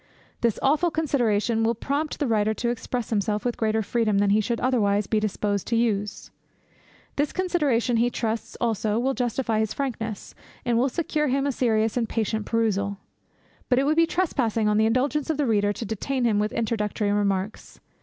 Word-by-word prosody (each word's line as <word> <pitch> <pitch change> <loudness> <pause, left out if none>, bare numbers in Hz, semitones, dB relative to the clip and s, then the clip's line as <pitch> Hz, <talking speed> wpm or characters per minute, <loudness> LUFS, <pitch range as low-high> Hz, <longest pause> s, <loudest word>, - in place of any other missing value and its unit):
This 235 -3 +1
awful 310 +5 +3
consideration 235 -8 +1
will 230 +1 +2
prompt 285 +6 -2
the 290 - 0
writer 220 -2 +1
to 235 - -1
express 240 0 -3
himself 210 0 0
with 245 - 0
greater 220 0 0
freedom 215 -1 +1
than 200 0 +3
he 215 +2 +4
should 235 +2 -2
otherwise 210 -5 +2
be 215 +3 +1
disposed 205 -1 -1
to 230 - 0
use. 210 -3 -1 0.9
This 290 0 +1
consideration 290 -11 +1
he 240 +2 +3
trusts, 225 -2 -3
also, 220 -2 0
will 260 +3 +1
justify 240 -2 -1
his 220 -1 -1
frankness, 225 -6 -4 0.3
and 240 -1 +1
will 250 +4 +3
secure 300 0 -1
him 275 +1 +1
a 285 - +1
serious 225 -3 +1
and 230 -3 0
patient 220 -1 -1
perusal. 200 -3 0 0.7
But 250 - +3
it 265 - +3
would 305 +2 +2
be 330 0 +4
trespassing 245 - 0
on 210 0 +2
the 220 - +4
indulgence 275 +6 0
of 315 - 0
the 295 - +1
reader 205 -3 +2
to 225 - -5
detain 240 +5 -2
him 215 -3 +2
with 210 0 0
introductory 210 -2 -1
remarks. 200 0 -2
230 Hz, 185 wpm, -25 LUFS, 210-260 Hz, 0.9 s, he